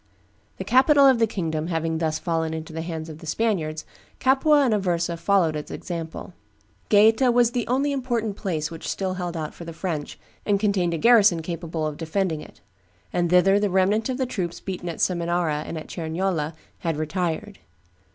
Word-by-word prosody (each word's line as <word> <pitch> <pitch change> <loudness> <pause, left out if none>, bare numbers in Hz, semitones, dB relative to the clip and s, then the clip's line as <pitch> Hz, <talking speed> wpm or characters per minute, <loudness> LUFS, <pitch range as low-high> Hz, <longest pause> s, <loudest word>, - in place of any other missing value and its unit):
The - - -4
capital 275 +3 +5
of 260 -3 +5
the 225 - +4
kingdom 160 -6 -3
having 165 -1 -1
thus 160 -1 0
fallen 160 -1 -1
into 160 0 -7
the 160 - -4
hands 160 -1 -5
of 155 -1 -9
the 165 - -11
Spaniards, 160 -5 -1 0.3
Capua 280 +2 +4
and 240 - +2
Aversa 175 -4 0
followed 170 -2 +2
its 150 - -5
example. 165 -2 -6 0.6
Gaeta 220 +5 +5
was 240 -1 +4
the 245 -1 -2
only 275 +4 +1
important 240 -6 -2
place 165 -7 -3
which 165 - -6
still 190 -1 -2
held 175 -2 -4
out 155 -1 -4
for - - -10
the 165 0 -7
French, 160 -4 -4 0.3
and 200 -1 +1
contained 190 -5 +1
a - - -2
garrison 205 -4 +5
capable 165 -1 -4
of 150 -1 -3
defending 165 -1 -1
it; - - -14 0.5
and 175 -1 +1
thither 190 +3 +5
the 205 0 +1
remnant 195 +5 +2
of 255 - -1
the 260 - 0
troops 175 -8 -4
beaten 180 -2 -5
at 165 - -5
Seminara 170 -3 0
and 165 - -5
at 155 - -6
Cerignola 165 -1 -2 0.2
had 165 -3 -2
retired. 175 +5 -3
175 Hz, 185 wpm, -24 LUFS, 160-210 Hz, 0.6 s, capital